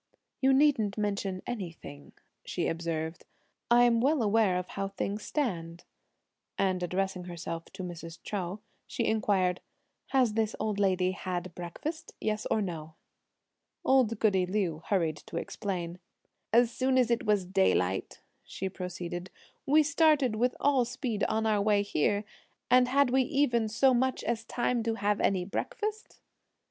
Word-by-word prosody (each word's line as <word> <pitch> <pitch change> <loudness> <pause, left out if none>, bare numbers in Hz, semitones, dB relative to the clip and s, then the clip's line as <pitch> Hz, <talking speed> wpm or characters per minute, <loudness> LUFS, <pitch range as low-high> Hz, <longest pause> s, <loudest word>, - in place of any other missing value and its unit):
"You 265 0 +5
needn't 265 -8 +3
mention 200 -3 -2
anything," 170 -10 -7 0.3
she - - -2
observed, 165 0 -3 0.5
"I'm 240 -1 +5
well 280 0 +3
aware 210 -3 +3
of 180 0 -4
how 195 0 -3
things 200 +1 -3
stand;" 175 - -3 0.7
and 185 -2 +1
addressing 185 0 -2
herself 170 -1 -5
to 185 - -6
Mrs. 165 -2 -7
Chou, 195 0 -4 0.3
she 240 -5 -2
inquired, 195 -5 +1 0.5
"Has 255 -5 +2
this 220 0 0
old 210 -2 -1
lady 185 -2 +2
had 185 -2 -4
breakfast, 300 - -6
yes 215 0 -1
or 215 - +2
no?" 160 -4 -6 0.9
Old 250 -4 +3
goody 190 -4 +3
Liu 180 -5 -1
hurried 170 -6 +1
to - - -8
explain. 180 -3 -4 0.5
"As 235 +1 +5
soon 260 +1 +1
as 245 -2 +3
it 235 -1 0
was 205 -3 +2
daylight," 175 - +1 0.2
she 190 - -5
proceeded, 180 -1 -5 0.4
"we 305 +3 +6
started 305 -6 +3
with 245 +3 +1
all 275 -3 +3
speed 240 -3 -3
on 220 +1 0
our 215 -2 +2
way 205 0 +3
here, 205 +2 +1 0.5
and 250 0 +6
had 275 0 +3
we 265 +1 +4
even 255 -5 +1
so 260 +4 +4
much 260 +1 +1
as 230 -1 -2
time 240 0 0
to 225 0 -1
have 205 0 0
any 185 -2 +1
breakfast?" 425 - -4
205 Hz, 145 wpm, -30 LUFS, 180-245 Hz, 0.9 s, we